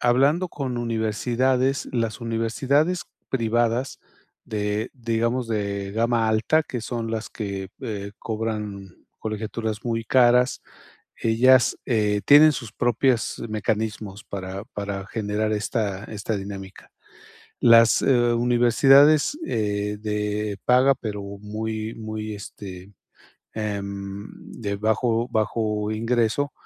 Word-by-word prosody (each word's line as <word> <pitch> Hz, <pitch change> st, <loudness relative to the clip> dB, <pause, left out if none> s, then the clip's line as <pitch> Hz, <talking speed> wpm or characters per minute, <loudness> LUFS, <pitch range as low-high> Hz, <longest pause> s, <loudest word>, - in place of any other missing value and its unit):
hablando 140 Hz, +9 st, +3 dB
con 130 Hz, -6 st, -4 dB
universidades, 120 Hz, +4 st, 0 dB
las 115 Hz, -1 st, -1 dB
universidades 130 Hz, +9 st, 0 dB, 0.2 s
privadas 120 Hz, +1 st, 0 dB, 0.5 s
de, 105 Hz, +1 st, -2 dB
digamos, 115 Hz, 0 st, -1 dB
de 100 Hz, -2 st, -2 dB
gama 115 Hz, 0 st, +1 dB
alta, 110 Hz, +9 st, +2 dB
que 125 Hz, -5 st, -5 dB
son 115 Hz, 0 st, -4 dB
las 115 Hz, 0 st, -3 dB
que, 100 Hz, -3 st, -5 dB
eh, 100 Hz, -5 st, -5 dB
cobran 105 Hz, -4 st, -4 dB, 0.2 s
colegiaturas 110 Hz, 0 st, -4 dB
muy 115 Hz, -1 st, -1 dB
caras. 125 Hz, 0 st, +4 dB, 0.5 s
Ellas, 120 Hz, +3 st, +4 dB
eh, 105 Hz, -4 st, +1 dB
tienen 150 Hz, +2 st, +8 dB
sus 115 Hz, -5 st, -6 dB
propias 120 Hz, +1 st, +1 dB
mecanismos 110 Hz, -1 st, -3 dB
para 95 Hz, 0 st, -6 dB
para 100 Hz, -1 st, -4 dB
generar 110 Hz, 0 st, -2 dB
esta 105 Hz, -2 st, -2 dB
esta 105 Hz, 0 st, -4 dB
dinámica. 95 Hz, -1 st, -8 dB, 0.7 s
Las, 115 Hz, -1 st, +6 dB
eh, -, -, +4 dB, 0.2 s
u -, -, +1 dB
universidades, 135 Hz, -, +5 dB
eh, 105 Hz, -1 st, -1 dB
de 105 Hz, -1 st, -2 dB
paga, 130 Hz, +2 st, +5 dB
pero 105 Hz, -5 st, -5 dB
muy 110 Hz, +2 st, -5 dB
muy, 110 Hz, -1 st, -5 dB
este, 100 Hz, -1 st, -9 dB, 0.6 s
em, 100 Hz, -1 st, -4 dB, 0.3 s
de 100 Hz, -2 st, -2 dB
bajo, 115 Hz, +3 st, +1 dB
bajo 105 Hz, -1 st, -1 dB
ingreso, 115 Hz, +5 st, 0 dB
110 Hz, 110 wpm, -24 LUFS, 105-120 Hz, 0.7 s, tienen